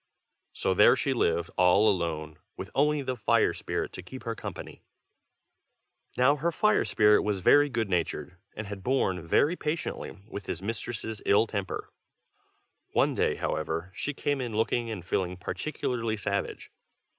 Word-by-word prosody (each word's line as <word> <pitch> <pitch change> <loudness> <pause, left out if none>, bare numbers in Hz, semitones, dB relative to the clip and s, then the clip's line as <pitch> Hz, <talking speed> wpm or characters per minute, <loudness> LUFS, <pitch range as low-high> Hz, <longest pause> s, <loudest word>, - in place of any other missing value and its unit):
So 95 - 0
there 105 +3 +6
she 135 - 0
lived 85 -8 0
all 90 +4 +5
alone, 80 -6 -1 0.2
with - - -7
only 150 +1 +2
the 130 -1 -2
fire 110 - +2
spirit - - -3
to - - -7
keep 110 +9 -10
her 115 - -2
company. - - -8 1.4
Now 135 +4 +4
her 170 +4 0
fire 215 +5 +2
spirit 105 -1 +4
was 100 -3 -1
very 145 +10 +5
good 115 -4 -1
natured, 90 0 -2 0.2
and 110 - -5
had 100 -1 -7
borne 95 -6 0
very 150 - +3
patiently 155 -1 -4
with 100 -2 -8
his 85 - -3
mistress' 110 +1 -4
ill 100 +3 +5
temper. 100 -4 -4 1.0
One - - +3
day, - - +1
however, 80 +4 -3
she 145 +6 -4
came 145 -1 -1
in 120 -4 -4
looking 115 +2 0
and 100 -6 -6
feeling 90 0 -1
particularly 115 0 -3
savage. 100 0 -3
110 Hz, 155 wpm, -28 LUFS, 95-130 Hz, 1.4 s, there